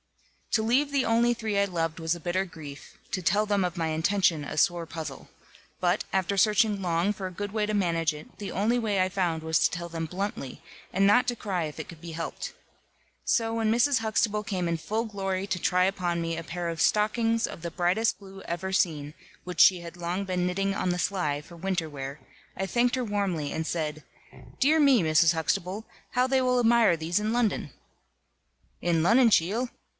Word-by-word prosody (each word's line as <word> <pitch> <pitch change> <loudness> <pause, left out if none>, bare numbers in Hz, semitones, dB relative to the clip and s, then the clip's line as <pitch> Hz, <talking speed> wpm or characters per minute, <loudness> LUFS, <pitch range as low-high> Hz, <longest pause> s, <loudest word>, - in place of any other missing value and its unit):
To 220 - +3
leave 265 +6 +2
the 280 -2 +1
only 235 +1 +3
three 220 -3 -2
I - - +4
loved 165 -4 -2
was 160 0 +1
a 175 - -5
bitter 175 +3 0
grief, 155 -6 -11
to 185 - -1
tell 205 +5 +2
them 205 -2 +1
of 180 0 -2
my 165 -1 0
intention, 160 0 +1
a 145 - -6
sore 170 +1 +2
puzzle. 155 -4 -7 0.5
But, 180 +2 +1
after 190 +1 0
searching 210 0 +3
long 175 +2 +1
for 195 -1 -6
a - - -7
good 205 +3 -5
way 215 -1 +1
to 215 - -2
manage 165 -5 +1
it, 150 +1 -12
the 205 - -5
only 220 +5 +1
way 210 -4 0
I 185 - +3
found 175 -4 -1
was 160 0 +2
to - - +4
tell 170 0 -5
them 165 -1 -4
bluntly, 185 -6 -5 0.3
and 195 +1 +3
not 230 +5 +5
to 240 -1 -1
cry 185 -6 -2
if 150 - -7
it - - -5
could 165 -2 -12
be 170 - -7
helped. 165 - -5 0.7
So 225 -1 +1
when 225 -1 +1
Mrs. 240 +3 +3
Huxtable 215 -1 0
came 185 -5 -2
in 170 - 0
full 215 +8 -2
glory 195 -3 -3
to 190 -2 -2
try 180 +1 +2
upon 180 -3 -1
me 165 0 -2
a 165 - -5
pair 175 +1 -4
of 165 -1 -3
stockings 225 +2 +2
of - - -9
the 170 0 -5
brightest 185 +7 +1
blue 195 -1 -12
ever 190 +2 -4
seen, 150 -5 0 0.3
which 180 0 0
she 180 -2 +6
had 170 0 -9
long 175 +3 -3
been 180 -1 -1
knitting 195 +2 0
on 185 - -1
the 180 0 -1
sly, 160 -7 -1
for 170 +3 -14
winter 180 -1 -2
wear, 140 -1 -7 0.4
I 190 - -1
thanked 240 +5 +1
her 255 -1 -2
warmly, 195 -8 -1
and 160 - -2
said: 155 -2 -3 0.6
"Dear 305 +4 +4
me, 275 -6 +5
Mrs. 160 +1 +4
Huxtable, 180 +6 -2 0.3
how 250 0 +3
they 265 0 +2
will 250 -1 +2
admire 230 -6 +4
these 165 +4 0
in 215 +1 -1
London." 225 - 0 1.1
"In 170 -2 +2
Lonnon, 230 +6 +5
cheel!" 220 +7 +2
185 Hz, 210 wpm, -27 LUFS, 165-215 Hz, 1.1 s, she